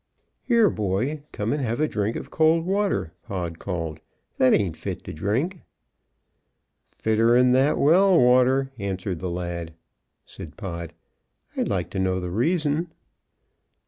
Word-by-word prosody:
"Here, 235 -3 +5
boy, 110 +9 -1
come 105 +5 -2
and 145 - -2
have 120 -1 -2
a 155 - +2
drink 105 -3 -2
of - - -7
cold 160 +1 +3
water!" 195 - 0
Pod 85 -4 -5
called. 80 -4 -4 0.4
"That 130 - +5
ain't 90 -6 +2
fit - - -6
to - - -7
drink." 120 - -1 1.3
"Fitter'n 115 +3 +3
that 135 +4 +3
well 180 +4 +5
water," 130 +2 +4
answered 95 -2 -3
the 90 - -3
lad. 85 -2 -5 0.5
Said - - -11
Pod: 85 -3 -6 0.6
"I'd - - -1
like - - -2
to 95 - -3
know 95 0 0
the 90 -1 -5
reason." 155 - 0
115 Hz, 140 wpm, -24 LUFS, 90-150 Hz, 1.3 s, Here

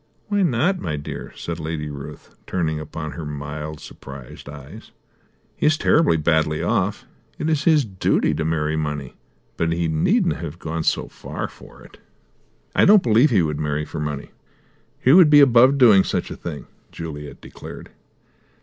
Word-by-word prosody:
"Why 205 -1 +1
not, 175 +4 +1
my 80 - -3
dear?" 75 0 -7
said 85 0 -5
Lady 80 -1 -4
Ruth, 70 0 -9
turning 80 -4 -1
upon 75 0 -6
her 85 - -7
mild, 75 +1 -6
surprised 70 0 -11
eyes. 70 -2 -11 0.7
"He - - +1
is 155 +1 +3
terribly 150 - +3
badly 80 0 +1
off; - - -1 0.3
it 155 - -3
is 155 -1 0
his 155 -5 +4
duty 95 -4 0
to 80 - -2
marry 80 -1 -1
money; 75 -4 -3 0.4
but 85 0 0
he 85 0 0
needn't 175 - +1
have 85 -1 -7
gone 80 -1 -4
so - - 0
far - - -6
for - - -16
it." - - -17 0.8
"I - - +4
don't 205 -1 +6
believe 120 +6 +4
he 100 -8 +3
would 75 -2 -2
marry 75 0 -2
for 80 - -7
money. 75 -2 -4 0.7
He 130 - +3
would 175 -3 +8
be 145 0 +7
above 130 0 +6
doing 110 -7 +6
such - - -3
a - - -5
thing!" 80 -4 -7 0.3
Juliet 75 -3 -8
declared. - - -11
80 Hz, 165 wpm, -22 LUFS, 75-125 Hz, 0.8 s, would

